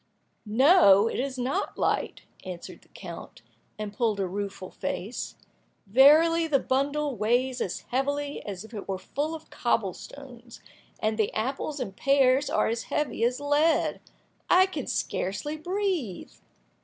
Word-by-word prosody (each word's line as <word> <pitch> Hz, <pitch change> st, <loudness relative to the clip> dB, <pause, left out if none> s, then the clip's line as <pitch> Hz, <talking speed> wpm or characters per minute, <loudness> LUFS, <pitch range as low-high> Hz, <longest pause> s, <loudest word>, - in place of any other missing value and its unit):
"No, 225 Hz, -, +6 dB
it -, -, -3 dB
is 265 Hz, 0 st, -3 dB
not 255 Hz, +2 st, -2 dB
light," -, -, -1 dB, 0.2 s
answered 180 Hz, -2 st, -8 dB
the -, -, -24 dB
count, -, -, -10 dB, 0.3 s
and 210 Hz, -1 st, -5 dB
pulled 215 Hz, -2 st, 0 dB
a 195 Hz, -, +1 dB
rueful 195 Hz, 0 st, -5 dB
face. 215 Hz, +7 st, -5 dB, 0.5 s
"Verily, 310 Hz, +9 st, +6 dB
the 295 Hz, -3 st, +3 dB
bundle 280 Hz, +2 st, -1 dB
weighs 245 Hz, +4 st, 0 dB
as 180 Hz, -, -3 dB
heavily 285 Hz, +3 st, -2 dB
as 200 Hz, -2 st, -6 dB
if 225 Hz, -, -15 dB
it 205 Hz, -, -7 dB
were 195 Hz, -1 st, -2 dB
full 290 Hz, +11 st, -3 dB
of 315 Hz, 0 st, -12 dB
cobble 220 Hz, -6 st, 0 dB
stones, 245 Hz, -2 st, -12 dB, 0.4 s
and 215 Hz, 0 st, -1 dB
the 215 Hz, -, +1 dB
apples 270 Hz, +6 st, -2 dB
and 195 Hz, -7 st, -5 dB
pears 275 Hz, +1 st, +3 dB
are -, -, +2 dB
as 225 Hz, +1 st, -2 dB
heavy 295 Hz, -6 st, -2 dB
as 245 Hz, +2 st, +1 dB
lead! 290 Hz, +3 st, +2 dB, 0.5 s
I 370 Hz, +1 st, +6 dB
can 380 Hz, -, -5 dB
scarcely 200 Hz, +11 st, -2 dB
breathe." 350 Hz, -, -3 dB
255 Hz, 145 wpm, -27 LUFS, 210-290 Hz, 0.5 s, No